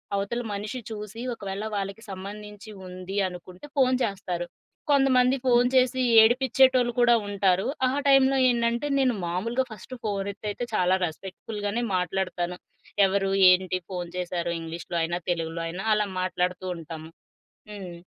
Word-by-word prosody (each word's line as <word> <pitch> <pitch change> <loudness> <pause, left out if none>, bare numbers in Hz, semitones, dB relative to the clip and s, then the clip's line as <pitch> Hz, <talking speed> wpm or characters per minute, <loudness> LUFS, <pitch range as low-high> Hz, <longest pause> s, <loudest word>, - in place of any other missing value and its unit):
అవతల 200 +5 -2
మనిషి 210 +5 -4
చూసి, 210 +2 -7
ఒకవేళ 200 -1 -5
వాళ్ళకి 200 +2 -4
సంబంధించి 210 +2 -8 0.2
ఉంది 185 +2 -7
అనుకుంటే 180 +5 -11
ఫోను 255 -1 +4
చేస్తారు. 180 -4 -3 0.5
కొంతమంది 265 -2 +4
ఫోను 245 0 +4
చేసి, 255 0 +3 0.2
ఏడిపించేటోళ్ళు 255 +1 +4
కూడా 240 0 +6
ఉంటారు. 195 -2 +1 0.2
ఆ - - 0 0.2
టైంలో 270 0 +5
ఏంటంటే 235 +3 0
నేను 255 -2 +3
మామూలుగా 230 +9 -1
ఫస్ట్ 220 +5 -9
ఫోను 200 -2 -2
ఎత్తేతే 210 +4 -5
చాలా 185 +1 +3
రెస్పెక్ట్‌ఫుల్‌ 190 +5 -7
గానే 235 +4 -1
మాట్లాడతాను. 180 -1 -2 0.5
ఎవరు? 195 0 0 0.2
ఏంటి? 185 0 +2
ఫోను 175 -2 -4
చేశారు.ఇంగ్లీష్‌లో 170 -1 -3
అయినా 170 +2 -1
తెలుగులో 165 0 -3
అయినా 180 +5 -5
అలా 210 -1 +1
మాట్లాడుతూ 180 0 -1
ఉంటాము. 160 -1 -8 0.6
హ్మ్. 180 -4 -8
200 Hz, 130 wpm, -26 LUFS, 180-235 Hz, 0.6 s, కూడా